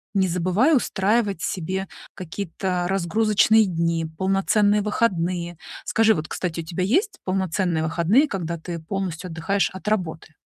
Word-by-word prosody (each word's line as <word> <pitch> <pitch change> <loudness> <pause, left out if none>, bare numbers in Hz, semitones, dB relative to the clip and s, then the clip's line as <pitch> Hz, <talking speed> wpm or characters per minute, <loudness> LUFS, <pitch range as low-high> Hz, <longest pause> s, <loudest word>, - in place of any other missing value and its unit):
не 190 -1 +3
забывай 185 - +2
устраивать 205 -4 0
себе 190 +2 -3 0.3
какие-то 180 0 -3
разгрузочные 215 +3 +3
дни, 165 -2 0
полноценные 205 +2 +2
выходные. 175 -5 -1 0.3
Скажи, 225 0 +4
вот, 155 -5 -4
кстати, 170 0 -3
у - - -10
тебя 170 +3 -3
есть 380 - +1
полноценные 185 -3 0
выходные, 170 - +3
когда 170 - -4
ты 170 +1 -5
полностью 180 0 -4
отдыхаешь 165 +5 0
от 190 +2 -10
работы? 170 -6 -2
190 Hz, 130 wpm, -23 LUFS, 170-205 Hz, 0.3 s, Скажи